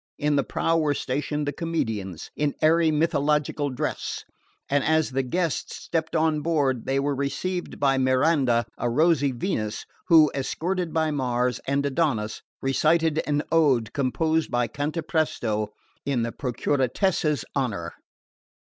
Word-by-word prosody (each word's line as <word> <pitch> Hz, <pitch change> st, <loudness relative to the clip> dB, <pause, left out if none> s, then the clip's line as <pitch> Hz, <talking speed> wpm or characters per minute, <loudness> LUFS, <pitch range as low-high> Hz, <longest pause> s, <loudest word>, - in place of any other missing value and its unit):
In 150 Hz, 0 st, +1 dB
the 140 Hz, -, +2 dB
prow 165 Hz, +5 st, 0 dB
were 150 Hz, -2 st, +1 dB
stationed 150 Hz, +3 st, -2 dB
the 145 Hz, -, -1 dB
comedians, 110 Hz, -, -3 dB
in 145 Hz, -1 st, 0 dB
airy 160 Hz, +1 st, +4 dB
mythological 150 Hz, -1 st, +1 dB
dress, 130 Hz, -, -3 dB, 0.4 s
and 140 Hz, -1 st, +1 dB
as 160 Hz, -2 st, +2 dB
the 135 Hz, +1 st, +1 dB
guests 165 Hz, +5 st, -2 dB
stepped 160 Hz, -1 st, -3 dB
on 155 Hz, -1 st, +2 dB
board 145 Hz, -7 st, 0 dB
they 135 Hz, +1 st, +1 dB
were 140 Hz, +1 st, 0 dB
received 140 Hz, +7 st, -3 dB
by 135 Hz, -1 st, +3 dB
Miranda, 130 Hz, -2 st, +3 dB
a 120 Hz, -, 0 dB
rosy 145 Hz, +1 st, +3 dB
Venus 120 Hz, -, -3 dB, 0.2 s
who, 160 Hz, -4 st, +6 dB
escorted 175 Hz, +5 st, -2 dB
by 160 Hz, -1 st, +1 dB
Mars 125 Hz, -3 st, 0 dB
and 140 Hz, +1 st, +1 dB
Adonis, 130 Hz, -7 st, 0 dB, 0.2 s
recited 160 Hz, +3 st, +2 dB
an 145 Hz, 0 st, +1 dB
ode 135 Hz, -9 st, +3 dB
composed 155 Hz, +4 st, 0 dB
by 120 Hz, -1 st, +1 dB
Cantapresto 150 Hz, -7 st, -1 dB, 0.4 s
in 135 Hz, -4 st, 0 dB
the 115 Hz, -, -2 dB
Procuratessa's 145 Hz, -, 0 dB
honour. 100 Hz, -11 st, -2 dB
145 Hz, 135 wpm, -25 LUFS, 130-160 Hz, 0.4 s, who